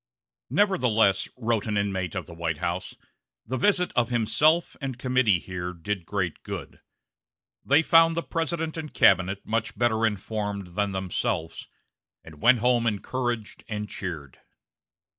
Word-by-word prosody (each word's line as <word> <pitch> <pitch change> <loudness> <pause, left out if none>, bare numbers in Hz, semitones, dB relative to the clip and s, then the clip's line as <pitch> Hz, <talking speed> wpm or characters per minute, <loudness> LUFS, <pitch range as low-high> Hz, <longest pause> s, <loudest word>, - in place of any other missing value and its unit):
"Nevertheless," 125 - +2
wrote 115 -3 -1
an 105 -1 0
inmate 95 -4 -1
of - - -3
the - - -11
White 85 -2 -2
House, 85 +4 -3 0.5
"the 130 - -3
visit 180 +2 +2
of 120 -1 +2
himself 150 +8 +2
and 135 -3 -4
committee 125 -6 +2
here 90 0 -5
did 90 +1 -4
great 95 -5 -2
good. - - -7 0.8
They 145 +4 +4
found 165 0 +5
the 170 - -1
President 165 0 -2
and 155 -2 -5
cabinet 95 +1 +3
much 110 -1 -2
better 115 -1 +1
informed 105 -3 -2
than 100 +1 0
themselves, 90 -3 -3 0.6
and 80 -2 -14
went 120 -1 +5
home 120 -1 +3
encouraged 120 +1 -3
and 105 -1 -3
cheered." 80 -10 -7
110 Hz, 140 wpm, -26 LUFS, 95-130 Hz, 0.8 s, found